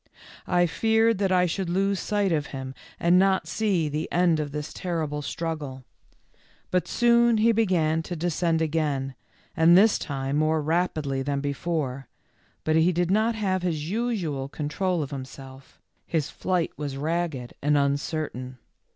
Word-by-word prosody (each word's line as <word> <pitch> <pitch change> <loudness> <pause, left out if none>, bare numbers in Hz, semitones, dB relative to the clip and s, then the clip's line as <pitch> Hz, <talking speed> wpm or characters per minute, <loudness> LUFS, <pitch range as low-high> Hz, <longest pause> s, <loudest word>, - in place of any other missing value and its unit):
I 175 -1 +3
feared 225 +6 +2
that 195 -2 +1
I 180 -1 +4
should 180 +1 -2
lose 195 +2 +1
sight 205 -1 0
of 150 -2 0
him 130 -1 -6 0.3
and 175 +2 +4
not 190 0 +2
see 195 -8 0
the 150 +1 -3
end 170 -2 +3
of 150 -2 -3
this 150 +1 -5
terrible 160 -5 -3
struggle. 145 -4 -4 0.9
But 180 -2 +1
soon 235 0 +4
he 225 +2 +4
began 175 -8 +2
to 175 +2 -6
de 175 +2 -1
scend 165 0 +1
again, 145 -4 -1 0.4
and 165 +2 +6
this 210 +2 +5
time 135 0 -2
more 155 +1 +2
rapidly 155 -3 0
than 140 +1 -1
before, 140 -2 -3 0.6
but 155 - +1
he 160 +3 +4
did 175 +1 0
not 220 +3 +2
have 190 -4 0
his 165 -2 -2
usual 190 - -2
control 160 +4 -1
of 140 - -7
himself, 135 0 -10 0.3
his 160 -4 -1
flight 180 -3 -1
was 145 -2 -4
ragged 155 -4 -2
and 145 +1 +3
uncertain. 140 -2 -2
160 Hz, 155 wpm, -26 LUFS, 145-185 Hz, 0.9 s, and